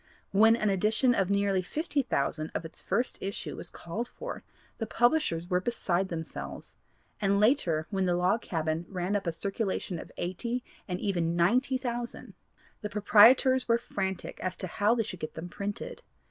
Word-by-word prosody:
When 220 +3 +6
an 215 -3 +1
edition 215 +6 +3
of 195 -5 +1
nearly 200 -1 +2
fifty 300 - -1
thousand 155 - -1
of 165 - -2
its 160 - -6
first 245 +2 0
issue 195 +1 -4
was - - -7
called 215 +8 -5
for, - - -7 0.4
the 225 - -2
publishers 240 - +2
were 180 -1 +1
beside 190 -4 0
themselves, 160 -3 -7 0.5
and 200 0 +3
later 205 - +3
when 190 -2 +1
the 175 - +2
Log 180 +6 +2
Cabin 160 0 -2
ran 185 +1 -2
up 195 -3 -1
a - - +2
circulation 195 -1 -2
of - - -10
eighty 235 +8 -2 0.2
and 180 -1 -3
even 170 -5 0
ninety 245 +10 +3
thousand, 240 -2 -5 0.5
the 210 - -3
proprietors 235 +5 +6
were 230 -1 +4
frantic 190 -5 -4
as 185 0 -3
to - - -3
how 205 +5 +2
they 230 - +1
should 190 -5 -7
get 155 - -6
them 165 +2 -6
printed. 200 +2 -5
200 Hz, 175 wpm, -29 LUFS, 175-235 Hz, 0.5 s, When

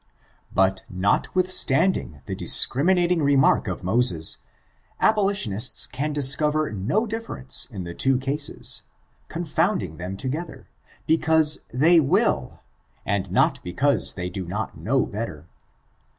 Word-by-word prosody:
But, 95 0 +1
notwithstanding 135 - 0
the - - -6
discriminating 175 +4 +3
remark 140 -4 +2
of 95 -2 -5
Moses, 90 -5 +3 0.6
abolitionists 195 - +2
can 150 +3 -4
discover 150 +1 +2
no 110 - -2
difference 225 - -1
in 100 -7 -8
the 85 0 -8
two 130 +7 +1
cases, 140 +3 0 0.5
confounding 160 - -2
them 90 +2 -7
together, 150 - -6 0.4
because 160 -1 +2
they 160 +7 +4
vnll, 140 -4 0 0.4
and 100 -2 -3
not - - +1
because 135 +11 0
they 90 -1 -4
do 95 -1 -7
not 105 +5 -5
know - - -1
better. 100 -8 -7
135 Hz, 110 wpm, -22 LUFS, 95-160 Hz, 0.6 s, they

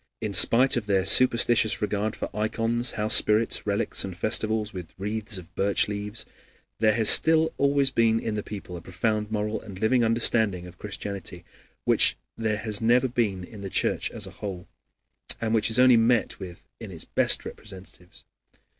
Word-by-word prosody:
In - - -4
spite 125 +2 +5
of 110 -3 -4
their 95 -2 +1
superstitious 120 -1 +3
regard 105 0 -2
for - - -7
ikons, 115 +3 0
housespirits, 105 +1 +2
relics, 100 0 +1
and 95 -3 -7
festivals 110 +1 +1
with 90 -3 -9
wreaths 105 +2 -3
of 90 -1 -13
birch 100 +1 0
leaves, 105 +2 -6 0.5
there 110 0 +3
has 110 -2 +1
still 160 +5 +5
always 140 -1 +1
been 115 -2 +1
in 110 - -4
the 105 - -3
people 100 -4 -9
a 85 - -8
profound 105 +4 -3
moral 105 0 -3
and 100 -4 -11
living 120 +4 +1
understanding 110 -5 +1
of 90 0 -14
Christianity, 100 -3 -7 0.4
which - - +3 0.2
there 110 -2 -2
has 105 0 -1
never 120 +3 +2
been 110 -7 -2
in 100 +3 -12
the 100 - -6
Church - - 0
as - - -5
a - - -10
whole, 95 -3 -8 0.7
and 110 -1 -2
which 110 -1 +1
is 110 - +2
only 125 -1 +5
met 115 +1 +1
with 90 -3 -11
in 115 -3 -9
its 85 -4 -7
best - - +2
representatives. 95 -3 -13
110 Hz, 170 wpm, -25 LUFS, 100-115 Hz, 0.7 s, spite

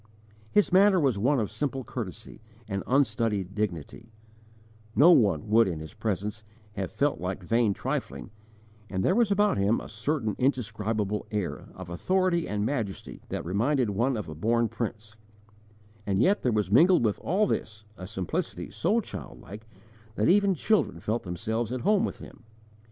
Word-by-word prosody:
His 210 -2 +3
manner 195 0 +6
was 130 -9 +1
one 135 +6 +2
of 105 - -2
simple 135 -2 -3
courtesy 110 - -7 0.3
and 100 -2 -2
unstudied 110 -7 +1
dignity: 105 +2 -4 0.8
no 150 +10 +7
one 100 - +3
would 115 0 +5
in 85 -4 -3
his 80 -1 -9
presence, 105 +1 -3 0.3
have 95 -2 -4
felt 145 -7 0
like 95 +1 -4
vain 115 +3 +2
trifling, 70 +7 -4 0.6
and 95 -1 -1
there - - +4
was 235 0 +3
about 205 - +2
him 100 +4 +2
a - - -9
certain 110 0 -2
indescribable 110 -5 -1
air 105 -4 -3
of 95 -1 -8
authority 175 - 0
and 105 0 -1
majesty 115 -7 -4
that - - -4
reminded 115 - +1
one 120 +5 0
of 105 - -5
a 80 - -6
born 115 +8 +1
prince; 110 -1 -5 0.9
and 95 -1 +1
yet 195 - +3
there 125 - +1
was 105 -3 0
mingled 165 - +5
with 105 - 0
all 200 +5 +1
this 110 - -3
a 95 - -8
simplicity 95 -3 -4
so - - +1
childlike 110 +3 -9 0.5
that 105 - +1
even 200 +1 +4
children 195 - +1
felt 110 +7 -2
themselves 110 +6 -3
at 130 -1 -3
home 205 0 +3
with - - -3
him. - - -13
110 Hz, 160 wpm, -27 LUFS, 100-140 Hz, 0.9 s, no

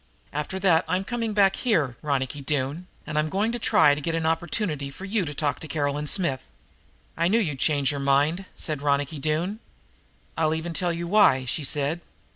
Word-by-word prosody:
After 150 +6 -3
that 185 -3 +3
I'm 185 +1 0
coming 230 0 -2
back 195 -2 +4
here, 155 - +1
Ronicky 140 -1 -2
Doone, 145 +4 -2 0.2
and 150 - -1
I'm 155 +1 0
going 205 +6 0
to 240 - -3
try 210 -10 +5
to 145 - -3
get 165 +3 -1
an 165 -1 -1
opportunity 160 -2 -1
for 185 +7 -9
you 200 -1 0
to 145 - -5
talk 145 -3 -1
to 160 - -8
Caroline 145 0 -1
Smith." 145 -8 +1 0.7
"I 170 +1 +1
knew 210 +5 +3
you'd 155 - -1
change 145 -2 +2
your 145 - -4
mind," 145 +7 +2
said 155 -3 -3
Ronicky 145 +1 0
Doone. 160 +8 -1 0.8
"I'll 160 -1 +1
even 165 +1 -4
tell 180 0 0
you 170 +1 -3
why," 170 -9 +4
she 145 +5 -1
said. 145 +4 0
155 Hz, 195 wpm, -25 LUFS, 145-185 Hz, 0.8 s, try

